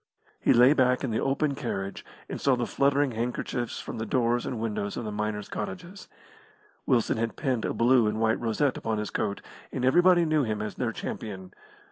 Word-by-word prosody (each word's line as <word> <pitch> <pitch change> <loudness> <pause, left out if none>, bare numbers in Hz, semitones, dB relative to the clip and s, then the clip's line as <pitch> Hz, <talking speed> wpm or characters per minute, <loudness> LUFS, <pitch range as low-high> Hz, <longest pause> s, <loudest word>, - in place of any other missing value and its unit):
He - - +3
lay 125 +4 +7
back 125 -3 +2
in 130 - -1
the 110 - 0
open 140 +2 0
carriage 100 -7 -4 0.2
and - - -6
saw 135 -2 +3
the 120 -1 -1
fluttering 140 +1 +2
handkerchiefs 120 +1 -3
from - - -6
the 110 - -2
doors 120 +1 +1
and 120 - -3
windows 105 -2 -3
of 120 - -4
the 105 - -3
miners' 105 0 -3
cottages. 185 0 -6 0.8
Wilson 120 -3 +2
had 115 0 -2
pinned 130 -6 -1
a - - -1
blue 120 -1 +4
and 105 +1 -1
white 110 0 +2
rosette 120 +4 0
upon 110 -1 -2
his 105 -1 -3
coat, 100 -2 -2 0.3
and 125 - -2
everybody 175 +5 +5
knew 155 -1 +2
him 110 -5 -1
as 105 0 -4
their 120 -3 -2
champion. 95 -4 -6
120 Hz, 195 wpm, -27 LUFS, 110-135 Hz, 0.8 s, lay